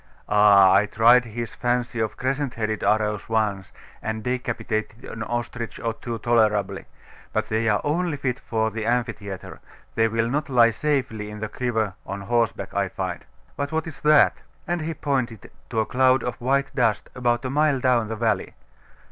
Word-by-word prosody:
'Ah! 100 -2 +6
I 105 +2 +4
tried 115 +3 +5
his 115 0 -5
fancy 120 -1 -1
of 110 -1 -2
crescent 135 0 -2
headed 110 -1 -2
arrows 105 -1 +1
once, 105 -4 -1 0.3
and 110 0 -4
decapitated 115 -2 -3
an 115 - -8
ostrich 120 0 -4
or 115 -1 -2
two 115 +1 -5
tolerably: 105 -4 +1 0.5
but - - -1
they 110 0 +1
are 105 - +2
only 160 +1 0
fit 130 -2 -2
for 110 -1 -1
the 110 0 -4
amphitheatre: 110 -5 -3 0.3
they 115 0 +3
will 115 +1 0
not 145 +5 -2
lie 120 -3 +5
safely 120 -7 -1
in 105 0 -8
the 110 0 -4
quiver 110 -5 -1
on 100 0 -5
horseback, 115 +2 -1
I - - 0
find. - - -4 0.3
But 140 0 -3
what 160 0 -1
is 160 -4 -9
that?' 150 -1 +5 0.3
And 175 -1 -1
he 160 +1 -3
pointed 130 -7 -2 0.2
to 115 - -1
a - - -1
cloud 130 +1 +3
of 125 - -4
white 135 +2 +1
dust, 115 -6 +1
about 120 -1 0
a 130 - -2
mile 150 -1 +2
down 125 -3 +2
the 110 - -4
valley. 110 -3 -1
115 Hz, 175 wpm, -24 LUFS, 110-130 Hz, 0.5 s, Ah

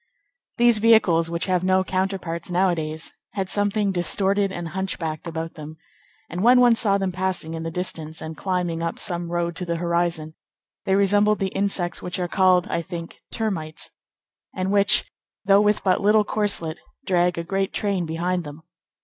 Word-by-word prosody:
These 235 -2 +4
vehicles, 195 -7 +4
which 170 0 -2
have 185 -2 0
no 185 0 +3
counterparts 185 -3 -3
nowadays, 170 -4 -1 0.2
had 195 -2 -3
something 205 0 +1
distorted 195 +3 +1
and 175 -3 -5
hunchbacked 170 -4 -4
about 165 0 -5
them; 155 0 -10 0.5
and 175 +3 -5
when 245 +4 +6
one 245 -1 +6
saw 200 -3 +3
them 195 -1 -1
passing 185 -3 -2
in 165 - -4
the 165 - -3
distance, 165 -2 -4
and 160 0 -6
climbing 180 -2 -2
up 165 0 -3
some 170 -1 -2
road 170 0 -1
to - - -4
the 170 -1 -2
horizon, 170 -2 -1 0.5
they 190 - +2
resembled 205 +2 +3
the 195 - -1
insects 195 -3 -1
which 180 0 -5
are 180 -1 -1
called, 185 -1 +3
I 170 - -1
think, 170 0 -8
termites, 190 -9 -3 0.6
and 185 +1 -1
which, 200 0 +3 0.4
though 195 +1 +5
with 210 0 +2
but 185 -2 +2
little 210 +1 +4
corselet, 200 -7 +1 0.3
drag 180 -2 +2
a 170 - -2
great 195 +3 -1
train 195 -5 -1
behind 175 +2 -1
them. 150 +1 -10
180 Hz, 170 wpm, -23 LUFS, 170-195 Hz, 0.6 s, when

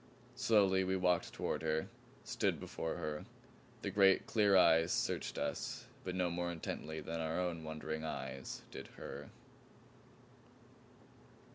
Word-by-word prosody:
Slowly 95 -4 +4
we 95 0 +1
walked 90 -2 +2
toward - - -2
her, 80 0 0 0.4
stood - - 0
before 80 - -3
her. 75 +2 -3 0.6
The 100 - -1
great 95 -1 +5
clear 105 -3 +4
eyes 80 -2 +6
searched - - 0
us - - -2 0.2
but 90 -1 -3
no 90 -1 +1
more 85 0 -1
intently 80 -1 -4
than 80 +2 -4
our 80 +2 -1
own 85 -3 -1
wondering 80 0 -4
eyes 65 -4 -5
did - - -7
her. - - -7
85 Hz, 130 wpm, -36 LUFS, 80-95 Hz, 0.6 s, eyes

